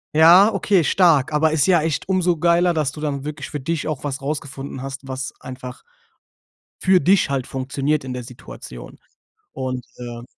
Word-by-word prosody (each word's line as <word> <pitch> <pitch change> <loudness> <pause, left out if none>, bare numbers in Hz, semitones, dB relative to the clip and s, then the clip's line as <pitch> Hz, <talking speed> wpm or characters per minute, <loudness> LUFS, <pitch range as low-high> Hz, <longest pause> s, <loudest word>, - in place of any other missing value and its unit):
Ja, 175 +7 +7
okay, 195 -2 +2
stark, 155 -5 +3
aber 155 +1 +2
ist 150 -3 +2
ja 175 -4 +4
echt 160 -1 -2
umso 180 -2 +1
geiler, 170 +1 +3
dass 150 -3 0
du 150 - -10
dann 140 -2 -3
wirklich 150 -1 -6
für 150 - -5
dich 155 +3 -3
auch 155 -4 -4
was 140 -2 -4
rausgefunden 140 -2 -5
hast, 135 0 -7
was 130 0 -5
einfach 125 -1 -9 1.0
für 185 -1 +4
dich 190 +3 +3
halt 135 -2 -2
funktioniert 135 +2 -2
in 130 - -5
der 125 0 -5
Situation. 115 - -11 0.5
Und 130 -1 -4
äh 120 -1 -8
145 Hz, 175 wpm, -21 LUFS, 130-165 Hz, 1.0 s, Ja